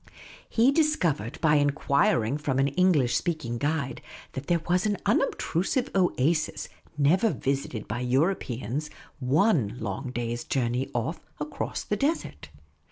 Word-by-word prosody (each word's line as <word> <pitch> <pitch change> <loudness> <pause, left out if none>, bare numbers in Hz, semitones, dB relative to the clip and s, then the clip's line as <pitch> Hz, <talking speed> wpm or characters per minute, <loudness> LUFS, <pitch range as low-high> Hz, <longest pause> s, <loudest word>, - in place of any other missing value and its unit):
He 240 +4 +4
dis 305 +1 +3
covered 145 - -1
by 150 -2 +4
enquiring 140 -3 +2
from 140 -3 -1
an 135 +1 +3
English 145 -5 +3
vSpeaking 155 -9 -3
guide 145 -3 -1 0.3
that 130 +2 -7
there 170 -2 +1
was 180 +3 +2
an 205 -1 0
unobtrusive 240 - 0
oasis, 170 -4 +1 0.3
never 175 +10 +4
visited 135 - -2
by 110 +3 -3
Europeans, 130 - -1 0.3
one 130 - +2
long 115 +5 -4
day's 120 -1 -3
journey 125 0 -1
off", 120 +8 -1 0.2
across 150 0 -4
the 210 - -2
desert. 295 +8 -2
145 Hz, 130 wpm, -27 LUFS, 125-180 Hz, 0.3 s, He